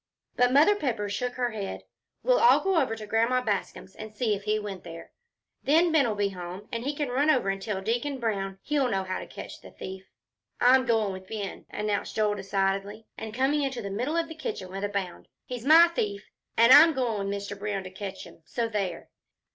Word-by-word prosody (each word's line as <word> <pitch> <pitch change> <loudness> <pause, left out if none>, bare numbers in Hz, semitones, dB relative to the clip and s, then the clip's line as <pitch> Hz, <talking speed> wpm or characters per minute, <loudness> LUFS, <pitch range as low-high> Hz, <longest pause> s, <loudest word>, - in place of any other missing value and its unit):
But 245 0 +3
Mother 300 +10 +6
Pepper 230 - -2
shook 245 +5 -2
her 245 -1 -1
head. 205 -3 -5 0.4
"We'll - - +4
all 475 - +6
go 380 -4 +2
over 225 -5 -1
to 215 -1 -8
Grandma 230 +4 +1
Bascom's 200 -3 -3
and 215 0 -9
see 220 -1 +1
if 200 0 -5
he 215 0 +1
went 200 -3 -6
there. 165 0 -10 0.5
Then 325 +4 +4
Ben'll 275 -9 +3
be 205 -1 +1
home, 185 +2 -8
and 230 -1 -3
he 285 +3 -2
can 290 -2 -2
run 280 +5 +2
over 255 -9 +3
and 195 0 -5
tell 195 -2 -3
Deacon 245 +6 -1
Brown. 195 -4 -2
He'll 285 -4 +1
know 195 -3 0
how 185 0 -3
to - - -8
catch - - -9
the - - -12
thief." 190 0 -9 0.5
"I'm 255 +1 +5
goin' 220 -4 +2
with 185 0 -9
Ben," 205 -3 -6
announced 210 -1 -2
Joel, 215 -1 +2
decidedly, 195 +2 -2
and 220 -1 -6
coming 265 +6 +1
into 265 -4 -2
the 200 - -5
middle 250 +11 -1
of 335 -1 0
the 320 - -8
kitchen 210 -12 -5
with 195 +1 -5
a 205 - 0
bound. 195 -3 -4 0.2
"He's 250 0 -6
my 330 +3 +9
thief. 210 -10 -3 0.3
An' 230 +2 +6
I'm 320 +2 +9
goin' 230 -7 -1
with 200 - -1
Mr. 200 0 -7
Brown 200 -1 -3
to 185 - -9
catch 195 0 -7
him. - - -14
So 230 +7 -2
there!" 200 -6 -4
215 Hz, 220 wpm, -27 LUFS, 195-255 Hz, 0.5 s, my